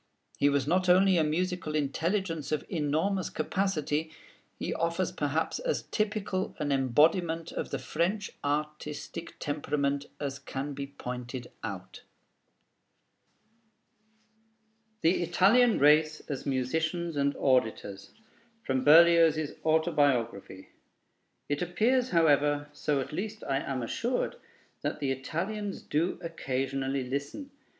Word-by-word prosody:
He 145 Hz, -, +4 dB
was 140 Hz, -2 st, +1 dB
not 180 Hz, +4 st, +1 dB
only 190 Hz, +1 st, +6 dB
a -, -, +3 dB
musical 170 Hz, 0 st, -1 dB
intelligence 165 Hz, +3 st, -1 dB
of 155 Hz, -, -1 dB
enormous 165 Hz, +4 st, 0 dB
capacity: 155 Hz, -2 st, -1 dB, 0.5 s
he -, -, -3 dB
offers 170 Hz, +1 st, -1 dB
perhaps 160 Hz, -1 st, -1 dB
as -, -, -1 dB
typical 210 Hz, -3 st, -1 dB
an 150 Hz, -2 st, -2 dB
embodiment 160 Hz, +6 st, +2 dB
of -, -, -4 dB
the -, -, -2 dB
French 195 Hz, +6 st, -1 dB
artistic 150 Hz, +2 st, -4 dB
temperament 145 Hz, -1 st, -1 dB
as 140 Hz, -1 st, -4 dB
can 140 Hz, +1 st, -5 dB
be 140 Hz, 0 st, -5 dB
pointed 125 Hz, -2 st, -7 dB
out. 95 Hz, -4 st, -7 dB, 3.0 s
THE 165 Hz, +3 st, +3 dB
ITALIAN 200 Hz, +8 st, +4 dB
RACE 150 Hz, +2 st, +4 dB
AS 140 Hz, -2 st, -6 dB
MUSICIANS 160 Hz, +6 st, -1 dB
AND 140 Hz, 0 st, +1 dB
AUDITORS 110 Hz, -7 st, 0 dB, 0.5 s
From 130 Hz, -5 st, 0 dB
Berlioz's 160 Hz, -1 st, +6 dB
Autobiography 140 Hz, -, +1 dB, 0.8 s
It 145 Hz, 0 st, -1 dB
appears, 235 Hz, +9 st, +1 dB
however, 145 Hz, -3 st, +3 dB
so 145 Hz, -1 st, 0 dB
at 130 Hz, -, -7 dB
least 215 Hz, +6 st, -4 dB
I 135 Hz, -, 0 dB
am 135 Hz, -3 st, -3 dB
assured, 245 Hz, -, -2 dB, 0.4 s
that -, -, -3 dB
the 140 Hz, -2 st, 0 dB
Italians 195 Hz, +10 st, -3 dB
do 165 Hz, +5 st, 0 dB
occasionally 135 Hz, -4 st, -2 dB
listen. 140 Hz, -, -4 dB
155 Hz, 110 wpm, -29 LUFS, 140-175 Hz, 3.0 s, only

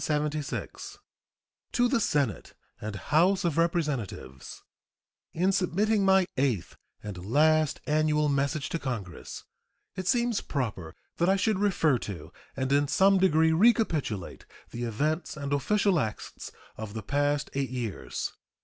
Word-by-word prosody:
To 150 Hz, -, -4 dB
the 245 Hz, -1 st, +1 dB
Senate 145 Hz, -, -1 dB, 0.3 s
and 110 Hz, -1 st, -5 dB
House 175 Hz, -, +2 dB
of 165 Hz, -4 st, +1 dB
Representatives: 150 Hz, -, -2 dB, 0.7 s
In 185 Hz, +4 st, +1 dB
submitting 195 Hz, +3 st, +1 dB
my 190 Hz, -1 st, +5 dB
eighth 130 Hz, -9 st, 0 dB, 0.3 s
and 100 Hz, -4 st, -7 dB
last 155 Hz, +7 st, +3 dB
annual 150 Hz, 0 st, +2 dB
message 140 Hz, 0 st, 0 dB
to 165 Hz, -, -2 dB
Congress 105 Hz, -, -6 dB, 0.5 s
it 185 Hz, -1 st, -4 dB
seems 240 Hz, 0 st, +2 dB
proper 100 Hz, -, -4 dB, 0.2 s
that 170 Hz, +2 st, +2 dB
I 195 Hz, -, +5 dB
should 205 Hz, 0 st, +1 dB
refer 170 Hz, -, +2 dB
to 100 Hz, -6 st, -7 dB, 0.2 s
and 130 Hz, 0 st, -1 dB
in 145 Hz, +1 st, +3 dB
some 195 Hz, +5 st, +4 dB
degree 160 Hz, -3 st, +4 dB
recapitulate 160 Hz, -, +1 dB, 0.2 s
the 120 Hz, +1 st, -4 dB
events 150 Hz, +9 st, -2 dB
and 140 Hz, -1 st, -3 dB
official 195 Hz, +5 st, +2 dB
acts 110 Hz, -6 st, -5 dB, 0.3 s
of 110 Hz, -1 st, -7 dB
the 110 Hz, -, -4 dB
past 145 Hz, +4 st, 0 dB
eight 135 Hz, -2 st, -1 dB
years. 120 Hz, -6 st, -4 dB
150 Hz, 130 wpm, -28 LUFS, 125-185 Hz, 0.7 s, my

